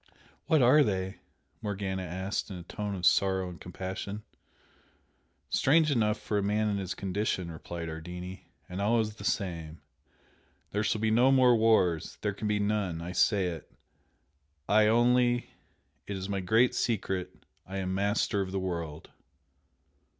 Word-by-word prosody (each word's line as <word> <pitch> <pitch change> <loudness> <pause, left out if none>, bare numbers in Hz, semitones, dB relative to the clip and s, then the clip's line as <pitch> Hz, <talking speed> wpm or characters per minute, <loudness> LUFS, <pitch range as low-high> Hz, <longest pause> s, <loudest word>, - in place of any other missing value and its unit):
"What 155 -5 +4
are 140 +5 +7
they?" 95 -4 -2 0.4
Morgana 100 -2 -3
asked 95 +4 -3
in 95 - -6
a 90 - -8
tone 105 +3 -4
of 90 -2 -3
sorrow 95 0 +3
and 90 - -11
compassion. 95 +3 -6 1.2
"Strange 155 +2 +3
enough 110 -4 +2
for 105 - -1
a - - 0
man 105 +2 +1
in 100 - 0
his 95 -2 -4
condition" 95 -2 -2
replied 85 +1 -6
Ardini 90 +3 -7 0.2
"And 90 +2 -5
always 110 0 +1
the - - -9
same. 85 -5 -2 0.9
'THERE 105 +1 0
SHALL 110 +1 0
BE 110 0 +2
NO 125 +4 +5
MORE 125 -2 +6
WARS! 110 -8 +2
THERE 105 -1 -1
CAN 105 +2 -4
BE 105 0 +1
NONE! 100 -5 0
I 85 +2 -5
SAY 95 -1 +2
IT! 80 -3 -8 1.0
I 105 +1 +5
ONLY! 120 +2 +3 0.6
IT 100 - -3
IS 95 0 -5
MY 100 -1 -2
GREAT 110 +7 +3
SECRET! 95 -5 -2 0.2
I 95 +1 -5
AM 95 -1 -2
MASTER 100 +1 +1
OF 95 -1 -3
THE 95 - -1
WORLD!' 85 -4 -5
100 Hz, 155 wpm, -29 LUFS, 90-110 Hz, 1.2 s, are